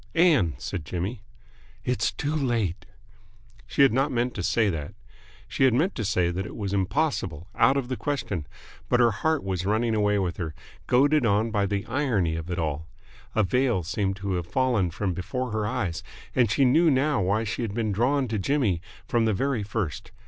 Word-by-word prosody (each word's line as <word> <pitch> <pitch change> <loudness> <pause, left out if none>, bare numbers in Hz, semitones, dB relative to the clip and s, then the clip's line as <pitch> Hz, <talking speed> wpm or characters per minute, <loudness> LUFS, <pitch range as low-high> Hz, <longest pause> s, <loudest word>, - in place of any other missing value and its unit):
"Ann!" 150 - +4
said 85 +5 -5
Jimmy. 90 - -4 0.6
"It's 125 - 0
too 150 +1 -3
late!" 115 - -1 0.8
She 140 - +3
had 135 - +5
not 135 +3 +2
meant 125 0 0
to 100 - -4
say 105 +5 +2
that. 80 -6 -3 0.5
She - - -1
had 125 -3 +4
meant 170 +9 +2
to 115 - -3
say 90 -3 +1
that 95 +2 -2
it - - -8
was 100 -3 -3
impossible, 95 - -1
out 135 - +4
of 135 -3 -1
the 130 - -2
question. 105 - -3 0.4
But 125 - +3
her 120 -1 +5
heart 160 +9 0
was 95 -2 -2
running 110 +2 +1
away 105 -1 +2
with 90 -3 -1
her, 80 -5 -4 0.3
goaded 140 +3 +4
on 110 +1 +2
by 100 -2 +1
the 100 0 -2
irony 115 - 0
of 80 +1 -5
it 90 - -2
all. 80 -1 -2 0.5
A 110 - +4
veil 120 -3 +1
seemed 95 +3 -1
to 100 0 -3
have 85 -1 -4
fallen 120 -6 +1
from 95 +2 -2
before 125 +8 -3
her 110 -1 -1
eyes, 105 -9 -2 0.3
and 120 -4 +4
she 135 +6 +3
knew 160 +7 +5
now 140 -3 +2
why 100 +4 +1
she 110 +2 -3
had 110 -3 -3
been 110 -3 0
drawn 130 +6 +1
to 110 -2 -1
Jimmy 105 - +1 0.3
from 115 -1 +2
the 110 - +2
very 135 +1 0
first. 100 - -3
110 Hz, 200 wpm, -26 LUFS, 95-130 Hz, 0.8 s, had